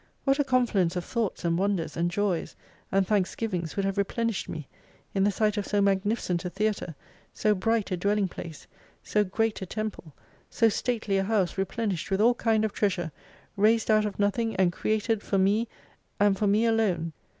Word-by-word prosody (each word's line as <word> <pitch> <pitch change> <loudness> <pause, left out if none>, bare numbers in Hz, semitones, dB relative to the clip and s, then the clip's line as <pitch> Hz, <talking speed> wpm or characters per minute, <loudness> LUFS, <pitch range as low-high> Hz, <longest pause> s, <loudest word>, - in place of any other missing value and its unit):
What 275 +1 +2
a - - +4
confluence 235 -10 +2
of 180 - -3
Thoughts 225 -7 -2
and 170 0 +1
wonders, 195 -4 -1
and 170 +1 +1
joys, 190 -1 -1 0.4
and 195 0 +3
thanksgivings 185 -3 -1
would 200 - 0
have 195 +1 -1
replenished 230 +1 -1
me 155 -4 -6 0.5
in 195 - +2
the - - +4
sight 210 +1 +1
of 205 - -2
so 205 - +1
magni 200 +2 +2
ficent 180 -6 -2
a 180 - -3
theatre, 200 -4 -2 0.4
so 215 - +2
bright 210 +1 0
a 185 - 0
dwelling 200 +2 +1
place; 165 -3 -9 0.4
so 210 - +2
great 215 +3 -1
a 190 - -4
temple, 210 -8 -5 0.3
so 230 -2 +3
stately 220 -3 -1
a - - +1
house 195 -3 +1
replenished 195 -2 -2
with 195 0 0
all 235 +3 +5
kind 225 -2 +1
of 215 - -3
treasure, 180 -5 0 0.4
raised 220 +2 +3
out 215 0 +4
of 205 - -6
nothing 220 +3 0
and 180 -2 +2
created 215 +2 0
for 195 - -1
me 205 +5 +2 0.5
and 205 -1 +4
for 205 +2 0
me 210 +3 +3
alone. 195 -8 +1
205 Hz, 190 wpm, -27 LUFS, 185-220 Hz, 0.5 s, all